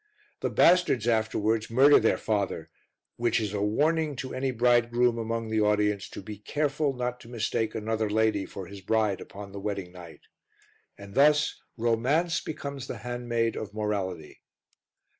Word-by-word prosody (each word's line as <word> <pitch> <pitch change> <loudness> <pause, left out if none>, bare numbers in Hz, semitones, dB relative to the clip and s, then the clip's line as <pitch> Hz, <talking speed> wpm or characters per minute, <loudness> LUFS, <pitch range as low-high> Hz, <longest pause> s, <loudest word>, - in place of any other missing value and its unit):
The - - -1
bastards 170 -10 +4
afterwards 110 -1 +1
murder 135 +5 +6
their 110 - +2
father, 100 -3 -2 0.5
which 120 -1 +1
is 105 -3 -3
a 100 - -1
warning 150 +8 +1
to 130 0 -6
any 135 +1 -1
bridegroom 120 0 +2
among 115 0 -3
the 110 -1 +2
audience 105 -1 +1
to - - -9
be 105 0 -8
careful 145 +4 -1
not 125 -1 -3
to 115 - -14
mistake 115 -1 -2
another 110 0 -1
lady 110 -2 +1
for 95 - -7
his 100 +2 -10
bride 105 0 0
upon 100 0 -9
the 100 - -7
wedding 100 -3 -4
night. 90 -2 -12 0.8
And 100 0 -11
thus 150 +2 +3 0.2
Romance 130 +10 +1
becomes 140 -3 -6
the - - -5
handmaid 120 -2 -2
of 105 -1 -6
Morality. 95 -7 -3
115 Hz, 155 wpm, -27 LUFS, 105-125 Hz, 0.8 s, murder